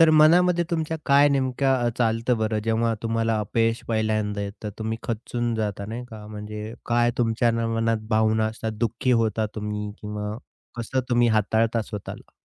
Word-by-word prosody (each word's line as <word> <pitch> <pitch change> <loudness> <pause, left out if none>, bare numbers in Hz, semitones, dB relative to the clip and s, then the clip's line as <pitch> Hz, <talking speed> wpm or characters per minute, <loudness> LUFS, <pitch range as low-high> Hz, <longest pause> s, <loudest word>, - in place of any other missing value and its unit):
तर 165 -1 +7
मनामध्ये 170 +3 +5
तुमच्या 160 -1 -1
काय 140 +1 +6
नेमकं 130 -2 +1
चालतं 115 +1 +1
बरं, 110 0 0
जेव्हा 115 0 +1
तुम्हाला 115 -1 0
अपयश 115 +2 0
पहिल्यांदा 110 -2 0
येतं. 100 +1 -5
तुम्ही 110 +1 -3
खचूंन 120 +1 -2
जाता 105 -2 -2
नाही 115 +3 -5
का 105 -1 -9
म्हणजे 105 +1 -7
काय 120 0 +3
तुमच्या 115 0 +2 0.2
मनात 115 -1 0
भावना 110 0 +2
असतात, 110 0 -4
दुःखी 120 +2 0
होता 110 0 0
तुम्ही 105 -1 -4
किंवा 105 0 -4 0.4
कसं 130 +3 -1
तुम्ही 120 -1 +4
हाताळता 110 +1 +2
स्वतःला? 105 -2 -8
115 Hz, 150 wpm, -24 LUFS, 110-120 Hz, 0.4 s, तर